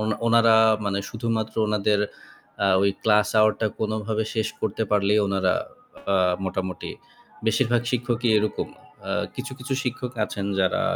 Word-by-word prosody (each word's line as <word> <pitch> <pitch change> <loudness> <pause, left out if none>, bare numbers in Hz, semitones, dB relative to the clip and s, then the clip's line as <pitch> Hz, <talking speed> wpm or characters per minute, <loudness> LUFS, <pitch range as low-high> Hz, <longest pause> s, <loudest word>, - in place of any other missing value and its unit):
On 110 - -1 0.2
ওনারা 115 -1 +5 0.3
মানে 100 -1 0
শুধুমাত্র 110 -1 -2
ওনাদের 105 -1 +1 0.6
আ - - +4 0.2
ওই 100 - +4
ক্লাস 105 -1 +4
আওয়ারটা 110 +1 +3
কোনোভাবে 110 0 -1
শেষ 110 -1 0
করতে 110 +1 -1
পারলেই, 105 0 +3
ওনারা 95 -2 +1 0.6
আ - - +4 0.3
মোটামুটি 95 -1 -4 0.6
বেশিরভাগ 120 +1 +2
শিক্ষকই 120 -1 0
এরকম। 105 -1 -2 0.4
আ - - 0 0.2
কিছু, 135 +2 -5
কিছু 135 +1 -3
শিক্ষক 125 0 -3
আছেন 100 -2 -5
যারা 95 - +1
110 Hz, 135 wpm, -24 LUFS, 100-115 Hz, 0.6 s, ওনারা